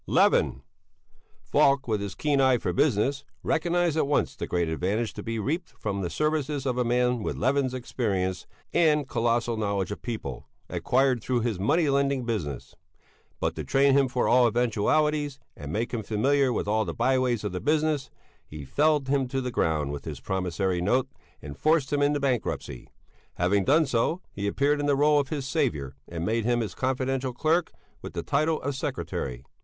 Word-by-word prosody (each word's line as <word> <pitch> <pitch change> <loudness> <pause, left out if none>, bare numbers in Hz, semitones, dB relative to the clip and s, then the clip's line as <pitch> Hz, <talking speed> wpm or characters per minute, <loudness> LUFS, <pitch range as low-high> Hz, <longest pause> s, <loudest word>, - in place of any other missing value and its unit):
Levin. 65 - +3 0.8
Falk, 140 -1 +3
with 110 -3 0
his 100 -2 -5
keen 145 -2 +1
eye 130 -2 +4
for 90 - -2
business, 135 - +1 0.2
recognized 175 0 +1
at 155 - +1
once 145 - +1
the - - -5
great 85 -1 0
advantage 100 +8 -1
to - - -7
be 115 0 -4
reaped 160 - -2
from 100 -2 -3
the 90 - -2
services 150 - -1
of 130 -2 0
a 125 - +1
man 125 0 +1
with - - -3
Levin's 130 +1 +1
experience 100 -7 -2 0.3
and 150 -4 +3
colossal 120 -1 0
knowledge 100 -3 -1
of 105 - -6
people, 110 - -5 0.2
acquired 130 -2 +1
through 125 +1 0
his 110 -5 -2
money 155 - +2
lending 140 -2 +1
business. 80 - -4 0.7
But - - 0
to - - -3
train 135 0 +3
him 135 -1 +4
for 125 -1 0
all 125 0 +5
eventualities, 135 +6 +1 0.2
and 75 0 -7
make 115 +8 -2
him 115 - -1
familiar 130 +6 +2
with 115 - -2
all 110 +1 +2
the 85 -5 -5
by 130 +2 +2
ways 120 -4 0
of 105 - -2
the 90 - -4
business, 150 -3 +1 0.3
he 75 -1 -9
felled 145 - +2
him 135 -1 +1
to 135 +1 -2
the 125 -1 -3
ground 75 -9 0
with 70 - -6
his - - -6
promissory 90 -1 -1
note, 125 +8 +1 0.3
and 70 0 -7
forced 155 -2 +1
him 145 - +2
into 145 0 +2
bankruptcy. 125 - -2 0.5
Having 95 +2 +1
done 155 +3 +4
so, 135 +6 0
he 100 0 -3
appeared 140 +7 +1
in 145 - -1
the 140 -1 +3
rôle 150 +1 +4
of 140 -2 -2
his 140 -4 -3
saviour 115 - -1
and 85 0 -4
made 115 +2 0
him 120 +1 +1
his 105 -5 -4
confidential 130 +1 -1
clerk 160 +7 +1 0.3
with - - -8
the - - -3
title 155 +2 +1
of 140 +2 -1
secretary. 125 - -4
125 Hz, 190 wpm, -27 LUFS, 105-140 Hz, 0.8 s, all